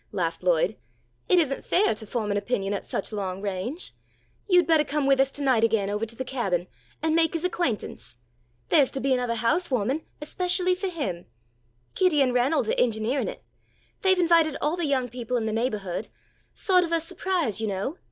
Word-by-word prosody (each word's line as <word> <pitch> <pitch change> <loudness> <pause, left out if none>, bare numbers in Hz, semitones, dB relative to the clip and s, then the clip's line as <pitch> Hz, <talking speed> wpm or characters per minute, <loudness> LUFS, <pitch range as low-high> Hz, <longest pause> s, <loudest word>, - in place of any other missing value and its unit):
laughed 165 -3 -2
Lloyd. 180 +3 +2 0.5
"It 365 - +5
isn't 280 -6 +1
fair 405 +2 +3
to 220 - -7
form 215 -2 -2
an 200 - +1
opinion 205 -2 -1
at 200 - -4
such 200 - -3
long 190 -2 -3
range. 200 - -4 0.6
You'd 360 -1 +5
bettah 315 -2 +3
come 295 -1 0
with 275 -1 +3
us 270 0 +4
tonight 265 -5 +1
again 215 -3 +2
ovah 210 +2 -2
to 230 - -10
the 260 - -5
Cabin, 200 -10 -1 0.4
and 320 0 +2
make 330 0 +3
his 330 - -2
acquaintance. 310 - -3 0.5
There's 280 -4 +5
to 270 - -2
be 270 0 0
anothah 245 -2 0
housewahming, 260 - 0 0.2
especially 360 +4 0
for 375 +2 -3
him. 280 - -4 0.7
Kitty 365 -5 +2
and 260 -3 +3
Ranald 250 +1 +2
are - - 0
engineering 230 +3 +1
it. - - -7 0.6
They've 380 -3 +4
invited 335 -4 +3
all 300 +3 0
the 345 -3 -1
young 260 -3 +1
people 245 0 -3
in 225 - -2
the 220 - -1
neighbourhood 210 -6 -2 0.5
sawt 365 -3 +3
of 335 - -4
a 335 - +3
surprise 330 - -1
you 220 - -1
know. 205 - -3
260 Hz, 190 wpm, -26 LUFS, 215-330 Hz, 0.7 s, It